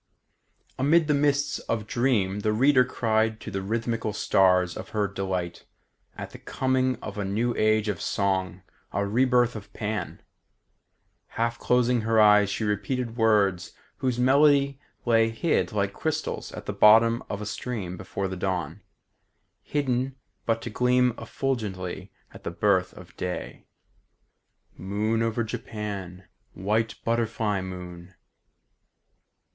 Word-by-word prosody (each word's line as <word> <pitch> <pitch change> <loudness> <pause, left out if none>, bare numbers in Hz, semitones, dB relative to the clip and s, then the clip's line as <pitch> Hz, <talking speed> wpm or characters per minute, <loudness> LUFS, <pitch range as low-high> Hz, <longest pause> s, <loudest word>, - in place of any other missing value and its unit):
Amid 155 +5 +4
the 150 - +3
mists 145 0 +1
of 110 -2 -1
dream 110 -5 +1
the 105 +1 0
reader 130 +3 +5
cried 110 -3 0
to - - -7
the 95 0 -3
rhythmical 115 +1 -2
stars 90 -3 +3
of - - -7
her 105 -1 +2
delight 95 -3 -4 0.5
at - - -7
the - - -11
coming 130 -1 0
of 105 -1 -6
a - - -1
new 110 +5 0
age 110 0 +2
of 100 -5 -2
song, 95 -2 -1 0.3
a 100 - -1
rebirth 120 +2 +2
of 105 -1 -9
Pan. 105 -4 -4 1.1
Half 115 +1 0
closing 125 -1 +2
her 110 0 +2
eyes, 105 -1 +6
she 105 - -2
repeated 115 +3 -2
words 105 -5 +2 0.2
whose 130 -2 -1
melody 140 +1 +4 0.3
lay 115 -1 +4
hid 120 +8 0
like 100 -2 -1
crystals 155 +4 -3
at - - -8
the - - -3
bottom 115 +2 +6
of 100 - -3
a 105 - -5
stream 105 -4 -4
before 95 +1 -4
the 95 - -5
dawn; 90 -4 -3 0.8
hidden 130 -2 -1 0.3
but 115 0 0
to 115 - -5
gleam 125 +1 +3
effulgently 100 -8 -3 0.2
at - - -13
the - - -3
birth 90 +1 +1
of 90 -1 -14
day. 90 -1 -5 1.1
"Moon 105 +5 -1
over 115 +1 0
Japan, 100 -5 -6 0.3
White 110 +4 -1
butterfly 115 -3 0
moon! 90 -1 -8
110 Hz, 135 wpm, -26 LUFS, 95-120 Hz, 1.1 s, eyes